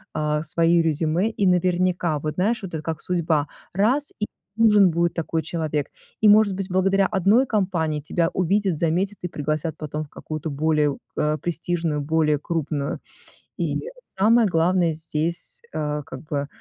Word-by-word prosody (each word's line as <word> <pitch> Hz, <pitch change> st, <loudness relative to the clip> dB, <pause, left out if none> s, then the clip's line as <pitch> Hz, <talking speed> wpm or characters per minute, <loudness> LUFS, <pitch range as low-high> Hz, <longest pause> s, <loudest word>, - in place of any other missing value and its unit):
э, 150 Hz, 0 st, 0 dB
свои 165 Hz, +1 st, +3 dB
резюме, 165 Hz, +5 st, +1 dB
и 205 Hz, -3 st, -1 dB
наверняка, 180 Hz, -2 st, +1 dB
вот 155 Hz, +1 st, -4 dB
знаешь, 215 Hz, +7 st, +1 dB
вот 185 Hz, -, -7 dB
это 155 Hz, -1 st, -4 dB
как 160 Hz, -1 st, -4 dB
судьба: 160 Hz, -4 st, 0 dB, 0.3 s
раз- 245 Hz, +10 st, +1 dB
и 210 Hz, -, 0 dB, 0.3 s
нужен 210 Hz, -5 st, +6 dB
будет 170 Hz, +1 st, +1 dB
такой 165 Hz, -1 st, -2 dB
человек, 155 Hz, -4 st, -2 dB, 0.3 s
и, 215 Hz, -, +5 dB
может 210 Hz, -1 st, +6 dB
быть, 190 Hz, 0 st, -4 dB
благодаря 190 Hz, +1 st, +2 dB
1 210 Hz, +7 st, +3 dB
компании 170 Hz, -8 st, 0 dB
тебя 165 Hz, +3 st, 0 dB
увидят, 190 Hz, -1 st, +1 dB
заметят 180 Hz, +6 st, 0 dB
и 180 Hz, -, -4 dB
пригласят 155 Hz, +1 st, -3 dB
потом 155 Hz, 0 st, -4 dB
в -, -, -21 dB
какую-то 155 Hz, +1 st, -6 dB
более, 150 Hz, -1 st, +1 dB, 0.2 s
э, 150 Hz, 0 st, +1 dB
престижную, 165 Hz, -2 st, -2 dB
более 150 Hz, 0 st, +2 dB
крупную. 150 Hz, -2 st, -3 dB, 0.6 s
И -, -, -1 dB, 0.4 s
самое 225 Hz, +3 st, +5 dB
главное 175 Hz, -1 st, +2 dB
здесь, 160 Hz, -, -3 dB
э, 150 Hz, -1 st, -2 dB
как 130 Hz, -, -9 dB
бы 145 Hz, -3 st, -3 dB
165 Hz, 155 wpm, -23 LUFS, 155-190 Hz, 0.6 s, нужен